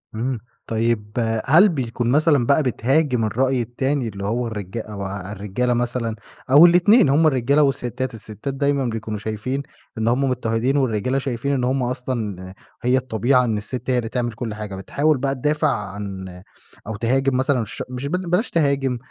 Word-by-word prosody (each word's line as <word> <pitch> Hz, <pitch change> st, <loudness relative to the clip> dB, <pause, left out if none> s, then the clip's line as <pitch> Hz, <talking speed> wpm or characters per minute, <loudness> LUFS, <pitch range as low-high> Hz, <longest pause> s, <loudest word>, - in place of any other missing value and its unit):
إمم 120 Hz, +2 st, -2 dB, 0.3 s
طيب 110 Hz, -2 st, -1 dB, 0.3 s
هل 170 Hz, +10 st, +6 dB
بيكون 120 Hz, -6 st, -2 dB
مثلًا 145 Hz, -3 st, +3 dB
بقى 140 Hz, +5 st, +3 dB
بتهاجم 130 Hz, 0 st, +1 dB
الرأي 130 Hz, +3 st, +1 dB
التاني 130 Hz, +3 st, -1 dB
اللي 100 Hz, -2 st, -6 dB
هو 120 Hz, +4 st, -1 dB
الرجا 105 Hz, 0 st, -5 dB
أو 105 Hz, -2 st, -7 dB
ا 95 Hz, 0 st, -6 dB
الرجالة 105 Hz, +5 st, -1 dB
مثلًا 120 Hz, -1 st, -1 dB, 0.4 s
أو 145 Hz, +5 st, +9 dB
الإتنين 175 Hz, -, +5 dB
هُم 155 Hz, +4 st, +4 dB
الرجالة 140 Hz, +1 st, +3 dB
والستات، 130 Hz, -2 st, -1 dB
الستات 110 Hz, +4 st, -6 dB
دايمًا 140 Hz, 0 st, 0 dB
بيكونوا 110 Hz, -2 st, -4 dB
شايفين 110 Hz, +6 st, -3 dB, 0.3 s
إن 110 Hz, 0 st, -1 dB
هُم 125 Hz, +4 st, +2 dB
مضطهدين 125 Hz, +2 st, 0 dB
والرجالة 130 Hz, 0 st, 0 dB
شايفين 135 Hz, 0 st, -2 dB
إن 130 Hz, -3 st, 0 dB
هُم 130 Hz, +1 st, +1 dB
أصلًا 115 Hz, -7 st, -4 dB, 0.3 s
هي 125 Hz, +2 st, +3 dB
الطبيعة 125 Hz, +1 st, +2 dB
إن 110 Hz, -3 st, 0 dB
الست 125 Hz, +4 st, -5 dB
هي 125 Hz, -, +2 dB
اللي 115 Hz, -2 st, -2 dB
تعمل 120 Hz, -1 st, -2 dB
كلّ 115 Hz, -1 st, -5 dB
حاجة، 105 Hz, -2 st, -6 dB
بتحاول 145 Hz, +10 st, +1 dB
بقى 135 Hz, +1 st, -1 dB
تدافع 150 Hz, +4 st, +1 dB
عن 100 Hz, -3 st, -4 dB, 0.6 s
أو 110 Hz, -, -4 dB
تهاجم 130 Hz, +4 st, +1 dB
مثلا 130 Hz, -3 st, +1 dB
ش -, -, -5 dB
مش 130 Hz, +2 st, -4 dB
بل 180 Hz, +3 st, -2 dB
بلاش 180 Hz, +8 st, +1 dB
تهاجم، 140 Hz, -5 st, +1 dB
125 Hz, 170 wpm, -22 LUFS, 110-135 Hz, 0.6 s, أو